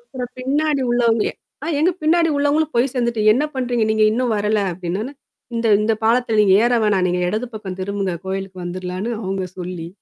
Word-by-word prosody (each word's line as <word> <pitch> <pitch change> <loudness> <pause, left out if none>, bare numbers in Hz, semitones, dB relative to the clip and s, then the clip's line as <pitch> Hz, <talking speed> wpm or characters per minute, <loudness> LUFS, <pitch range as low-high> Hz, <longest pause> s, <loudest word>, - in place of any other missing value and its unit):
அப்புறம் 255 - -7
பின்னாடி 285 +3 0
உள்ளவங்க 230 -2 +2 0.4
அ - - -4
எங்க 345 +4 +4
பின்னாடி 330 +2 +3
உள்ளவங்களும் 295 +2 +1
போய் 240 +2 +2
சேந்துட்டு 235 -3 0
"என்னா 275 +7 +1
பண்றீங்க 245 -3 0
நீங்க? 220 0 +3
இன்னும் 240 +1 0
வரல!" 210 +1 +1
அப்படின்னோன்ன, 185 +9 -4 0.4
இந்த 230 0 0 0.2
இந்த 220 +1 +2
பாலத்துல 230 -1 +2
நீங்க 195 -2 +5
ஏற 240 - +2
வேணாம் 195 -3 +2
நீங்க 180 0 0
எடது 220 +5 -2
பக்கம் 190 -3 -6
திரும்புங்க, 195 -1 -2
கோவிலுக்கு 190 -1 -4
வந்துரலான்னு 185 +5 -4
அவுங்க 190 -1 -2
சொல்லி. 175 -2 -5
220 Hz, 175 wpm, -20 LUFS, 190-255 Hz, 0.4 s, நீங்க